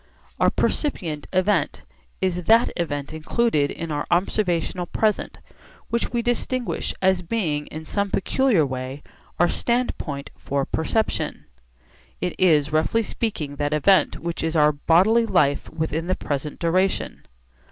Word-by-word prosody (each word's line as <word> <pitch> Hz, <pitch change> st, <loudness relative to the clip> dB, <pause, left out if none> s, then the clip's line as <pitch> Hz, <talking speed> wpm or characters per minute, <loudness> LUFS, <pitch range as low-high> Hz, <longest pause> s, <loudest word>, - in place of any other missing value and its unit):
Our -, -, +5 dB
'percipient 165 Hz, -, -1 dB
event' 185 Hz, +3 st, +1 dB, 0.4 s
is 180 Hz, -2 st, -1 dB
that 230 Hz, +4 st, +5 dB
event 145 Hz, -4 st, -3 dB
included 160 Hz, -1 st, +1 dB
in 165 Hz, -1 st, -5 dB
our 145 Hz, -1 st, -2 dB
observational 175 Hz, -1 st, 0 dB
present 215 Hz, +3 st, 0 dB, 0.5 s
which 235 Hz, 0 st, -1 dB
we 235 Hz, -1 st, -1 dB
distinguish 245 Hz, +1 st, -1 dB
as 190 Hz, -1 st, +3 dB
being 165 Hz, -6 st, -2 dB
in 160 Hz, +1 st, -8 dB
some 200 Hz, +4 st, -1 dB
peculiar 205 Hz, -, +2 dB
way 130 Hz, +2 st, -5 dB, 0.4 s
our 175 Hz, -, +5 dB
standpoint 170 Hz, -, -2 dB
for 140 Hz, 0 st, -2 dB
perception. 220 Hz, +7 st, -1 dB, 0.7 s
It 180 Hz, -, -2 dB
is 155 Hz, -5 st, +4 dB
roughly 160 Hz, +9 st, +2 dB
speaking 155 Hz, -11 st, -3 dB
that 145 Hz, +1 st, 0 dB
event 190 Hz, +6 st, +3 dB
which 170 Hz, 0 st, -4 dB
is 160 Hz, 0 st, -1 dB
our 150 Hz, -1 st, +5 dB
bodily 190 Hz, +10 st, +3 dB
life 150 Hz, -8 st, +2 dB
within 160 Hz, +1 st, -3 dB
the 185 Hz, -, +1 dB
present 145 Hz, 0 st, -4 dB
duration. 185 Hz, +3 st, 0 dB
170 Hz, 130 wpm, -23 LUFS, 150-205 Hz, 0.7 s, Our